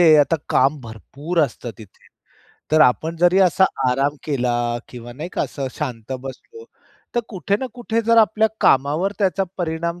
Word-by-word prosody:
म्हणजे 160 -3 +7
आता 150 +3 +3
काम 140 +3 +2
भरपूर 135 - -6
असतं 125 -3 -3
तिथे. 105 -4 -16 0.6
तर 155 - +5
आपण 155 +4 +3
जरी 175 +2 +4
असा 190 0 +4 0.3
आराम 140 +3 0
केला 125 -5 0 0.4
किंवा 120 -1 -10
नाही 150 +7 -7
का - - -1
असं 140 -2 -4
शांत 125 -5 -5
बसलो 135 - -10 0.5
तर 240 - +2
कुठे 195 - -1
ना 260 - -2
कुठे 230 -2 -1
जर 230 0 +4
आपल्या 220 0 +4
कामावर 150 +9 +2
त्याचा 195 -1 +1
परिणाम 170 0 -3
155 Hz, 160 wpm, -21 LUFS, 135-190 Hz, 0.6 s, म्हणजे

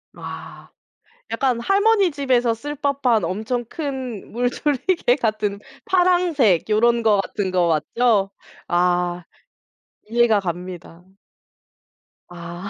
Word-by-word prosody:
아. - - -9 0.6
약간 255 -4 0
할머니 400 - +3
집에서 255 -5 +1
쓸 290 +6 -6
법한 270 - +1
엄청 220 +7 -2
큰 260 - -6
물조리개 250 +4 0
같은 215 -4 -2 0.3
파랑색 350 - +2
요런 235 +2 +3
거 210 -3 +3
같은 195 -1 -3
거 180 -2 +2
맞죠? 195 +6 +1 0.4
아 175 0 +1 0.8
이해가 230 -2 +3
갑니다. 180 -1 -7 1.3
아. 175 +2 -8
230 Hz, 190 characters per minute, -21 LUFS, 185-275 Hz, 1.3 s, 할머니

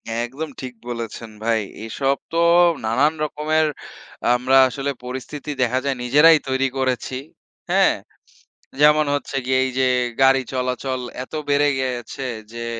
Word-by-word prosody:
একদম 130 +7 -4
ঠিক 130 -1 -6 0.2
বলেছেন 115 -1 -6
ভাই। 115 -1 +1 0.2
এসব 135 +4 0
তো 165 - -2 0.5
নানান 135 +8 +2
রকমের 155 +1 0 0.7
আমরা 130 +2 +3
আসলে 140 +3 -3
পরিস্থিতি 130 +4 -7
দেখা 125 +1 +2
যায় 135 -1 0
নিজেরাই 150 +6 +6
তৈরি 130 0 +1
করেছি, 130 -1 -1 0.5
হ্যাঁ? - - +4 0.9
যেমন 150 0 +6
হচ্ছে 145 - -5
গিয়ে 130 0 +2
এই 130 - -2
যে, 130 - +3 0.3
গাড়ি 135 0 +5
চলাচল 130 0 -2 0.2
এত 130 - -16 0.2
বেড়ে 145 +1 +3
গেছে 130 +1 -4 0.3
যে, 115 0 -5
130 Hz, 130 wpm, -21 LUFS, 125-145 Hz, 0.9 s, নিজেরাই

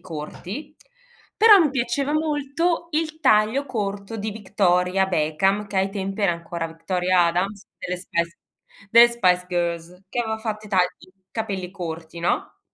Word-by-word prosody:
corti. 185 - -7 0.7
Però 430 -3 +10
mi 315 -6 +3
piaceva 270 +2 -1
molto 310 +2 0
il 315 0 -1
taglio 230 +1 +3
corto 205 -3 -4
di 215 0 -3
Victoria 190 -2 +1
Beckham, 190 +5 +1
che 200 - -6
ai 190 +1 +2
tempi 195 +1 -4
era 200 - +4
ancora 170 0 -5
Victoria 180 +2 +1
Adams, 195 +4 -2
delle 180 - -3
Spice 170 -1 -3 0.5
delle 235 +1 +8
Spice 180 -6 +2
Girls, 175 0 -3
che 240 - -2
aveva 220 -1 -2
fatto 215 -1 -5
i - - -12
tagli, 185 -3 +3 0.5
capelli 195 -5 -3
corti, 165 -2 -7
no, 175 - -2
195 Hz, 145 wpm, -23 LUFS, 180-235 Hz, 0.7 s, Però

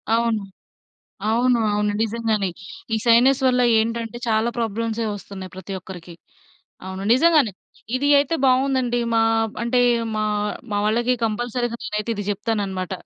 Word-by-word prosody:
అవును. 230 -2 +1 0.9
అవును. 245 +2 +3
అవును 210 0 0
నిజంగానే, 220 -3 0 0.5
ఈ - - +1
సైనస్ 250 +4 +5
వల్ల 250 -1 +3 0.2
ఏంటంటే, 230 +1 -2
చాలా 220 +1 +2
ప్రాబ్లమ్సే 230 0 -2
వొస్తున్నాయి 195 -2 -9
ప్రతి 190 +1 -7
ఒక్కరికి. 180 -2 -10 0.7
అవును, 190 +1 -6
నిజంగానే 295 -4 +4 0.4
ఇది 275 +3 0
అయితే 285 +3 +1
బావుందండి. 260 -2 +2
మా 225 - +4 0.4
అంటే, 240 +1 +1 0.4
మా 215 - 0 0.5
మా 205 - 0
వాళ్ళకి 240 +4 +2
కంపల్సరీగా 240 +2 -2
నేనైతే 210 +1 -3
ఇది 205 - -4
చెప్తానన్నమాట. 200 -3 -3
230 Hz, 125 wpm, -22 LUFS, 210-245 Hz, 0.9 s, సైనస్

